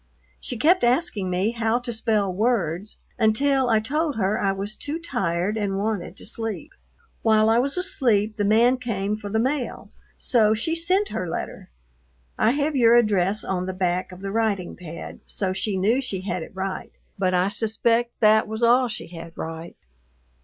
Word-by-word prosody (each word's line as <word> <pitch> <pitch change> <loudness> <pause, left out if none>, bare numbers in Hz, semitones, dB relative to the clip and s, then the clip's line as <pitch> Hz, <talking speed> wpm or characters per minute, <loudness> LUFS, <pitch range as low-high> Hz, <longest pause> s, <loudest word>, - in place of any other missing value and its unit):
She 245 - -5
kept 330 +8 +3
asking 240 - +2
me 185 +5 0
how 230 0 0
to 245 -1 -4
spell 215 -4 0
words 205 -3 -1 0.2
until 265 +4 +2
I 220 -1 +4
told 295 +6 -1
her 205 0 0
I 195 - +1
was 200 +2 -5
too 295 +2 -4
tired 210 - -1
and 200 -2 -1
wanted 200 -3 -3
to - - -9
sleep. 220 -6 -4 0.5
While 220 0 +4
I 230 - +4
was 275 +6 0
asleep 230 - +1
the 205 - 0
man 230 +5 +4
came 210 -5 -2
for 210 -1 -7
the 220 - 0
mail, 260 +3 -2 0.3
so 220 -4 +3
she 275 +9 -1
sent 365 +5 +1
her 180 -2 -3
letter. - - -5 0.7
I - - +3
have 290 +4 0
your 235 -2 +5
address 210 -3 +2
on 185 -1 -2
the 185 - -3
back 185 0 -1
of 180 +1 -11
the 195 0 -4
writing 210 -5 -1
pad, 170 -2 -9
so 190 -2 -2
she 195 +1 -1
knew 220 +8 +2
she 195 -8 -4
had 185 -2 -3
it 160 - -10
right, 190 0 -4 0.3
but 185 -1 +1
I 180 +2 +2
suspect 230 +2 0
that 215 0 +5
was 220 +2 -4
all 245 +2 +5
she 220 - -6
had 165 -1 -10
right. 165 +1 -7
215 Hz, 180 wpm, -24 LUFS, 190-240 Hz, 0.7 s, your